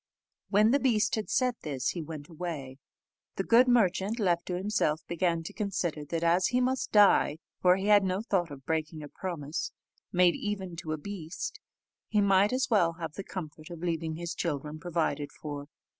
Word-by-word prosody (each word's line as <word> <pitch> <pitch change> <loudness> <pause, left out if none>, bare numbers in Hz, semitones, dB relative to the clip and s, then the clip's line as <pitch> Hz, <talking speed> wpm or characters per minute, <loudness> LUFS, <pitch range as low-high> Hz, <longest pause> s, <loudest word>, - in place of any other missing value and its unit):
When 210 +2 +5
the 280 - +4
beast 225 -5 +2
had 215 -2 -1
said 250 -2 +1
this, 135 -5 -2
he 175 - -3
went 150 -2 -7
away. 155 -6 -6 0.6
The 195 - -1
good 235 +5 +5
merchant, 210 -2 +2
left 175 -4 +1
to 180 - -2
himself, 180 -6 0
began 170 -1 0
to - - -7
consider 180 -7 -2
that 165 +3 -3
as 175 +2 +4
he 250 - +1
must 255 +1 0
die 205 -7 +5 0.2
for 180 0 +6
he 190 +1 -3
had 205 -1 +6
no 190 +2 -1
thought 185 -7 0
of 135 -2 -10
breaking 155 -1 -2
a - - -7
promise, 155 -3 -4 0.4
made 180 -1 +5
even 195 -4 -4
to 155 -1 -4
a - - -2
beast 170 -1 -6 0.5
he 210 - +1
might 200 0 +4
as 255 +2 +1
well 175 -8 +3
have 165 -2 -6
the 195 - -6
comfort 155 -5 -7
of 170 -1 -8
leaving 165 -2 -1
his 170 +1 -4
children 150 -2 -3
provided 160 -4 -1
for. 145 -2 -7
175 Hz, 190 wpm, -29 LUFS, 155-205 Hz, 0.6 s, for